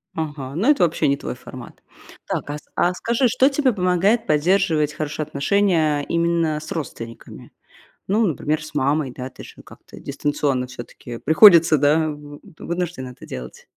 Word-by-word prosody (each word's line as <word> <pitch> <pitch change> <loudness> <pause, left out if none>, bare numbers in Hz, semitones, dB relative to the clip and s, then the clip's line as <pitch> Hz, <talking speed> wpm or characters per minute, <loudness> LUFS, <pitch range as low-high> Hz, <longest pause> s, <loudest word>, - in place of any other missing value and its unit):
Ага, 145 -4 -5
ну 210 - +1
это 295 -10 +4
вообще 165 -2 +1
не 140 - +2
твой 140 - -6
формат. 125 -1 -12 0.5
Так, - - -3
а 145 - -3
с - - -13
а 175 - +2
скажи, 235 +7 +1
что 255 +3 +3
тебе 275 -2 +1
помогает 195 +3 +1
поддерживать 155 -1 +2
хорошие 155 0 -4
отношения, 155 0 +1
именно, 170 -1 0
с 155 - -10
родственниками? 115 -7 -8 0.6
Ну, 215 +4 +2
например, 155 -2 -1
с 155 - -11
мамой, 145 -1 0
да, 125 +1 -7
ты - - -13
же - - -12
ну - - -14
как-то - - -15
дистанционно 140 -3 -2
всё-таки 120 -1 -9
приходится, 165 - +6
да, 150 +3 +3
вы 145 -1 -9
т 185 -6 -16
вынуждены 170 -7 -4
это 125 - -13
делать. 60 -1 -9
155 Hz, 170 wpm, -21 LUFS, 145-180 Hz, 0.6 s, приходится